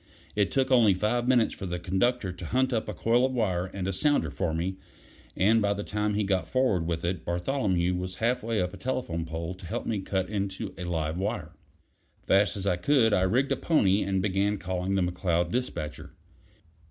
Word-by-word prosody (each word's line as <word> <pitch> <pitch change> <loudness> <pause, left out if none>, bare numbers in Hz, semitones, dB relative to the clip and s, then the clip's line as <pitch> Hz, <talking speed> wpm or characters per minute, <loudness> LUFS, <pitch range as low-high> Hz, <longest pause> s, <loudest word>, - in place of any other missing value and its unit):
It 100 -2 +2
took 135 -1 0
only 115 -7 +5
five 120 +5 0
minutes 125 -3 +3
for 95 - -6
the 90 0 -2
conductor 95 +4 0
to 90 -1 -8
hunt 130 +4 +1
up 110 -2 -1
a - - -3
coil 120 +5 +2
of 130 0 +1
wire 95 -7 0
and 95 0 -5
a 95 - -1
sounder 120 - +1
for 80 - -1
me, 85 +4 -2 0.6
and 110 +4 +4
by 100 0 +1
the 100 - -4
time 105 0 -1
he 105 - +1
got 95 -2 0
forward 115 -11 +1
with 85 -1 -2
it, 90 -2 -2
Bartholomew 90 - 0
was 90 +1 -4
half 125 +2 0
way 115 -1 -1
up 90 -1 -1
a - - -8
telegraph 90 -7 -3
pole 80 +2 -4
to 90 0 -12
help - - -3
me 110 -3 -1
cut 95 -1 -2
in 100 -1 -1
on 105 -4 -4
a 90 - -4
live 80 -1 -2
wire. 100 +2 -3 0.7
Fast 100 +2 +3
as 100 - -4
I 90 -3 +2
could, 115 +1 +3
I 100 - +3
rigged 125 +9 +2
a - - +3
pony, 105 - +2
and 95 -1 0
began 100 +1 +1
calling 95 0 -2
the 95 - +2
McCloud 85 -1 0
despatcher. 105 -12 -4
95 Hz, 215 wpm, -28 LUFS, 90-115 Hz, 0.7 s, only